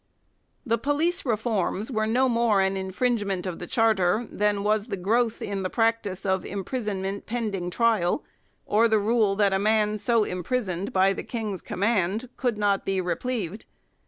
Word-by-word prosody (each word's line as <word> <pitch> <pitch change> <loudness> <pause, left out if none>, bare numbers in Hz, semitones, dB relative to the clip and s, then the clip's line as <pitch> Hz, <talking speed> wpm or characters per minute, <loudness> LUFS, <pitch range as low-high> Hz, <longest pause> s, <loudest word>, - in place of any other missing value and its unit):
The 230 -2 +1
police 290 +5 0
reforms 220 -1 -1
were 215 -2 0
no 255 +4 +3
more 230 -4 +2
an 190 0 +2
infringement 195 0 -1
of 180 -3 -4
the 175 - -6
Charter 215 0 +2
than 205 -1 0
was 210 0 +1
the 195 - -3
growth 225 +5 0
in 200 -1 -3
the 185 - -2
practice 225 -4 0
of 190 -2 +1
im 200 -1 -4
prisonment 200 -4 -3
pending 210 -6 -2
trial, 225 - +1 0.4
or 225 +3 +3
the 220 -1 +3
rule 215 -1 +2
that 200 -1 +3
a 190 - +2
man 215 0 +2
so 230 +1 +2
imprisoned 185 0 -2
by 190 +1 +3
the - - -5
King's 215 -5 -4
command 205 +3 0
could 245 -4 -1
not 205 -2 +1
be 195 -1 -1
re 180 -1 0
plevied. 215 -3 -4
210 Hz, 170 wpm, -26 LUFS, 190-230 Hz, 0.4 s, no